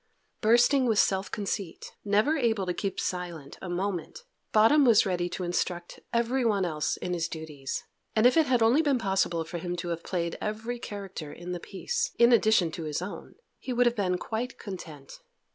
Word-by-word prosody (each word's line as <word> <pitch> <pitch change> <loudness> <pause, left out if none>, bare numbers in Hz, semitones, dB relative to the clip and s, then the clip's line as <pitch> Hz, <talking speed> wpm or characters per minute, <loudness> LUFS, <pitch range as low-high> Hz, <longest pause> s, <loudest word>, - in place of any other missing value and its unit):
Bursting 245 +4 +4
with 220 -3 +2
self 190 -1 +2
conceit, 195 -3 -4
never 210 +9 +2
able 225 -8 +1
to 180 - -1
keep 195 +1 -3
silent 175 -6 -4
a 185 - -6
moment, 190 - -3 0.3
Bottom 225 +8 +6
was 230 -5 +6
ready 175 -2 -1
to 185 - -4
instruct 175 0 -2
everyone 235 -4 +1
else 155 -3 -1
in 180 - -3
his 170 -1 -1
duties, 155 -5 -5 0.3
and 220 +1 +4
if 250 - +6
it 320 -2 +4
had 250 -3 +3
only 240 +7 +5
been 285 -4 +2
possible 190 -6 0
for 170 +2 -6
him 175 +1 -3
to 175 0 -4
have 170 -1 -3
played 170 -2 -2
every 225 +3 -3
character 195 -9 -7
in 175 +1 -8
the 175 - -3
piece, 470 - -3
in 235 +1 +6
addition 215 -7 +4
to 160 0 -6
his 150 -1 -2
own, 180 +3 -7 0.2
he 260 - -5
would 245 +1 +3
have 240 0 +3
been 185 -4 0
quite 225 +6 -4
content. 160 -9 -9
195 Hz, 190 wpm, -28 LUFS, 175-235 Hz, 0.3 s, Bottom